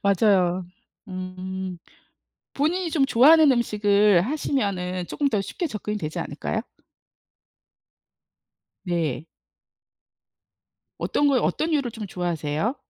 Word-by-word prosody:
맞아요. 190 -3 +3 0.4
음. 185 0 -6 0.8
본인이 335 +5 0
좀 290 -4 +2
좋아하는 290 +4 +6
음식을 210 -5 +3
하시면은 200 - -2
쪼끔 285 -2 0
더 210 - 0
쉽게 335 - -4
접근이 210 -3 -4
되지 155 -4 -5
않을까요? - - -3 2.2
네. 165 -6 -2 1.7
어떤 290 0 +1
거, 265 -3 +3
어떤 320 +2 0
류를 280 -6 0
좀 220 -3 -7
좋아하세요? 175 - -2
205 Hz, 220 characters per minute, -24 LUFS, 180-270 Hz, 2.2 s, 좋아하는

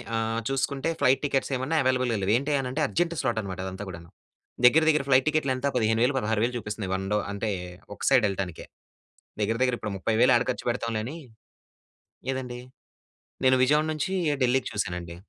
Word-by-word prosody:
ఆహ్, 115 0 -1
చూసుకుంటే 135 +2 -1
flight 130 +1 +3
tickets 135 -1 0
ఏమన్నా 130 +5 -2
అవైలబుల్ 130 -1 +1
లేవు. 95 +1 +1
ఏంటయ్యా 140 0 0
అంటే 150 +4 -2
అర్జెంట్ 170 +2 -1
స్లాటన్నమాట 110 -8 -2
అదంతా 95 +2 -6
కూడాను. 85 -2 -10 0.6
దగ్గర 155 +6 +6
దగ్గర 150 -2 +3
ఫ్లైట్ 130 -1 +5
టికెట్లు 155 -3 0
ఎంత? 130 +2 -2
15,000 115 +3 +2
16,000 110 +1 0
చూపిస్తున్నాయి 105 -3 -5
వన్ 95 0 -3
డో - - +3
అంటే 105 +1 -2 0.4
ఒక - - -20
సైడ్ 130 -4 +5
వెళ్ళటానికే. 95 -4 -4 0.8
దగ్గర 110 +2 +1
దగ్గర 125 -1 +2
ఇప్పుడు 105 -2 -4
30,000 110 +6 +3
యాడ 120 - +3
ఖర్చు - - -7
పెడతాంలే 115 -2 -2
అనీ 145 +7 -6 1.2
ఏదండి? 125 -2 -5 0.8
నేను 130 0 +5
విజయవాడ 150 +4 +3
నుంచి 155 +5 -2 0.3
ఢిల్లీకి 125 +1 +2
చూసానండి. 90 -4 -3
125 Hz, 160 wpm, -26 LUFS, 105-135 Hz, 1.2 s, దగ్గర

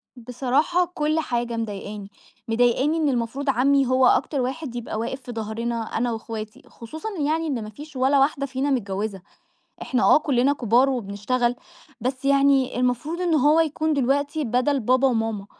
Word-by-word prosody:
بصراحة، 260 +8 0
كل 310 0 0
حاجة 240 -5 -2
مضايقاني، 205 -2 -6 0.4
مضايقاني 245 +7 +2
إن 310 -3 +1
المفروض 255 +3 -2
عمي 270 +1 +3
هو 255 0 +3
أكتر 275 +2 +2
واحد 260 +1 -4
يبقى 235 -2 -4
واقف 250 +4 -4
في 245 - -8
ضهرنا 225 +1 -3
أنا 240 +1 0
وإخواتي، 220 -1 -6
خصوصًا 315 - -8
يعني 315 +3 0
إن 255 -7 -2
ما 215 - -7
فيش 295 +7 -12
ولا 265 +2 +3
واحدة 275 0 +1
فينا 265 +1 -2
متجوزة، 200 -5 -2 0.6
إحنا 255 -1 -1
آه - - +6
كُلّنا 275 -2 +2
كبار 250 0 +2
وبنشتغل، 240 +2 -1 0.5
بس 260 +3 -3
يعني 275 -2 +3
المفروض 250 +8 -1
إن 345 -3 +1
هو 300 +3 +4
يكون 315 0 0
دلوقتي 285 +3 0
بدل 255 +4 +1
بابا 255 +4 +3
وماما، 225 -4 -2
255 Hz, 160 wpm, -23 LUFS, 230-285 Hz, 0.6 s, آه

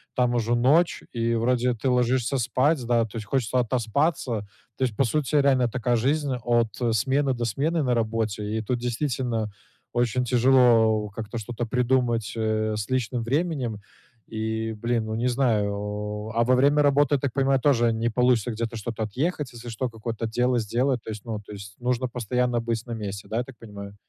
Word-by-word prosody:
там 125 -1 +2
уже 120 0 +1
ночь, 150 +9 +3
и 115 -1 0
вроде 125 +1 +1
ты 130 +4 -1
ложишься 125 +1 +1
спать, 130 +4 +1
да? 120 -1 +3
А 115 - +1
то 115 +1 -8
есть 105 -2 -6
хочется 130 0 0
отоспаться. 120 -1 0 0.3
То - - -14
есть, 120 -5 0
по 135 - +3
сути, 150 +4 0
реально 135 -4 +4
такая 125 0 0
жизнь 140 +4 +1
от 120 -1 +2 0.3
смены 135 +5 +1
до 120 -1 -2
смены 150 +9 0
на 125 -2 +1
работе. 110 -2 -1
И - - -1
тут 120 +3 -2
действительно 120 -3 -2 0.4
очень 120 +1 +1
тяжело 120 -3 +4
у - - -7
как-то 110 +3 -6
что-то 115 +2 -4
придумать, 120 -4 +1
э, 110 -1 0
с 105 +1 -4
личным 125 -1 -1
временем 135 - -1 0.5
и, 110 0 -3
блин, 115 +1 -1
ну, 110 - -4
не 120 +2 0
знаю. 120 -5 +1
О, 105 +1 -4
а 115 - +4
во 130 +1 +4
время 145 +3 +4
работы, 145 0 +4
я - - 0
так 135 -2 -2
понимаю, 135 -1 +2
тоже 120 -4 +3
не 115 +1 0
получится 125 -1 +2
где-то 115 +1 -3
что-то 110 0 -4
отъехать, 140 - -2
если 120 +1 -9
что, 120 +2 -2
какое-то 115 0 -5
дело 125 +2 +1
сделать. 120 +3 0
То - - -8
есть, 105 0 -8
ну 115 - -4
вот, 105 -1 -6
то - - -11
есть 100 -1 -9
нужно 125 +1 0
постоянно 125 0 -1
быть 115 -1 -2
на 115 - -4
месте, 100 -2 -5
да, 110 - -3
я 120 - +1
так 130 -1 -13
понимаю? 100 -2 -9
120 Hz, 195 wpm, -25 LUFS, 110-130 Hz, 0.5 s, реально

